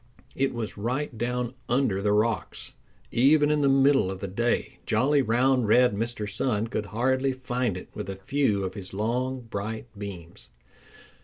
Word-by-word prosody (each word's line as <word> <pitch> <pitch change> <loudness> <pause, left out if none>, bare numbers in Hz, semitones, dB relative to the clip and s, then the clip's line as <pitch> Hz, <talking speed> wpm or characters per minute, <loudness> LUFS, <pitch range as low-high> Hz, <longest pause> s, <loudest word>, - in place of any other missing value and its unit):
It 135 0 +1
was 110 -3 -5
right 125 +5 -2
down 120 +2 -2 0.2
under 120 -6 +1
the 105 +1 +1
rocks. 105 -2 0 0.4
Even 145 +5 +4
in 150 -1 +2
the 140 - +4
middle 135 -5 +4
of 95 -1 -5
the 100 - -4
day 120 +6 -1
jolly, 140 +6 +3
round, 125 0 +2
red 125 +1 +5
Mr. 115 0 -3
Sun 110 +1 -1
could 105 - -3
hardly 130 +5 +1
find 125 -5 -2
it - - -9
with - - -6
a 95 - -4
few 115 -2 0
of 95 0 -3
his 95 -2 -8
long, 125 +5 -1
bright 110 0 -5
beams. 95 -5 -9
120 Hz, 165 wpm, -27 LUFS, 105-130 Hz, 0.4 s, red